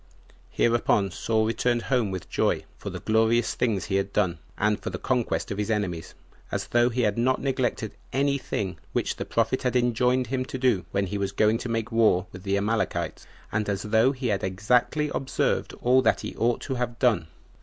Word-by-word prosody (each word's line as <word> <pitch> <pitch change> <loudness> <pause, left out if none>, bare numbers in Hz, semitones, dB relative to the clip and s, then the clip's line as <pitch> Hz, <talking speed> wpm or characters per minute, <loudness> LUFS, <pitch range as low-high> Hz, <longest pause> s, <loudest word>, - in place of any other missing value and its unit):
4. - - -26 0.2
Hereupon 115 -4 +2
Saul 110 +3 0
returned 120 +1 0
home 125 -6 +1
with 95 -2 -5
joy, - - 0 0.2
for - - -5
the - - -7
glorious 115 +2 +2
things 105 -7 0
he 95 - 0
had 100 0 -1
done, 90 -6 0 0.2
and 105 +1 +1
for 95 - -3
the 90 - -4
conquest 125 +1 -1
of 100 - -3
his 105 - -1
enemies, 95 -7 -2 0.4
as - - -2
though 120 0 +4
he 125 +1 -1
had 105 -1 +1
not 130 +2 +2
neglected 125 -5 -1 0.2
any 140 +1 +1
thing 95 -8 -3
which - - -1
the - - -4
prophet - - 0
had 125 -1 -1
enjoined 125 +1 +2
him 130 +2 -1
to 130 - -6
do 120 -9 +2
when 100 0 0
he 100 +2 -3
was 100 -1 -1
going 110 +3 +2
to 125 - -5
make 115 +1 -2
war 110 -5 +3
with 95 - -10
the 100 +1 0
Amalekites, 110 +3 -1 0.2
and 105 -1 -1
as 100 -1 -1
though 110 +4 +3
he 130 -3 -3
had 100 -2 0
exactly 120 +10 +1
observed 135 - -1
all 130 +2 +5
that - - +2
he - - -6
ought 120 +1 +1
to 135 - -3
have 120 -2 -3
done. 120 - +2
115 Hz, 210 wpm, -26 LUFS, 100-125 Hz, 0.4 s, all